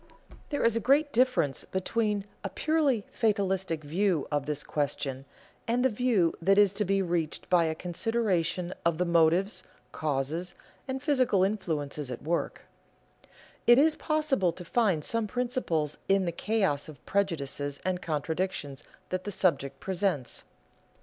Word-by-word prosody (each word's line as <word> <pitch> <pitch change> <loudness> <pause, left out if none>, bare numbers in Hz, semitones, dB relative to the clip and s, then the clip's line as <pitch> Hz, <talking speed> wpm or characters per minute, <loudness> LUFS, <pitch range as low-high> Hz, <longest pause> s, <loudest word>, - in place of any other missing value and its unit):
There 290 - -1
is 230 -1 +3
a - - +2
great 285 +6 +3
difference 245 - +2
between 205 +1 -1 0.2
a 195 - -2
purely 290 -3 +1
fatalistic 190 -7 0
view 170 +1 0
of 145 -1 -1
this 150 -1 -1
question 135 -2 -2 0.4
and 245 +2 +1
the - - +5
view 215 -7 +2
that 195 +3 +4
is 205 -2 +5
to 210 +1 -1
be 195 +1 +2
reached 170 -3 -2
by 175 -2 +5
a 160 0 -1
consideration 180 -1 -1
of 170 -1 +1
the 180 - +1
motives, 170 +4 +3 0.3
causes, 155 +4 -2 0.3
and 265 0 -4
physical 255 - +3
influences 155 -8 -2
at 125 - -6
work; 170 +3 -2 1.0
It 240 0 +8
is 305 +3 +5
possible 300 - +1
to 180 - -9
find 190 -7 +1
some 230 -2 0
principles 235 - -1
in 195 -1 +3
the 170 - 0
chaos 175 -6 0
of 140 -5 -13
prejudices 145 -7 -1
and 185 -1 -1
contradictions 155 -2 -3 0.3
that 185 0 -2
the 205 - -4
subject 140 -8 0
presents. 185 -8 -1
185 Hz, 145 wpm, -29 LUFS, 155-220 Hz, 1.0 s, It